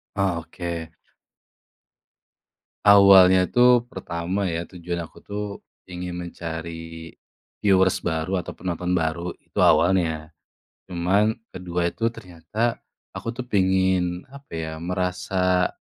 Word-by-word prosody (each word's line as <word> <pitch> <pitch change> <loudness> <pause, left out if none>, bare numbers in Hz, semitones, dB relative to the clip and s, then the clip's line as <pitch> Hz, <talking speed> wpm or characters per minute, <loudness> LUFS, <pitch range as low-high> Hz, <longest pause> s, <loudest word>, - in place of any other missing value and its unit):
Oh 95 -4 0
oke. 85 -1 -6 1.9
Awalnya 95 -2 +8
tuh, 120 +1 +4
pertama 90 -4 -4
ya, 85 +1 -3
tujuan 85 -1 -5
aku - - -18
tuh, 105 +1 -4 0.4
ingin 90 -1 -6
mencari 80 -1 -7 0.5
viewers 95 -2 +3
baru 85 +3 -1
atau - - -9
penonton 90 0 -3
baru, 85 0 0
itu - - -39
awalnya. 80 -4 +3 0.5
Cuman 95 +5 +1 0.2
kedua 90 -1 -2
itu 115 +5 -2
ternyata, 105 +3 -3 0.3
aku 115 - -5
tuh 125 - -5
pengen, 95 -3 +2
apa 140 +1 -14
ya, 80 -1 -3
merasa, 90 +1 0
90 Hz, 105 wpm, -24 LUFS, 85-95 Hz, 1.9 s, Awalnya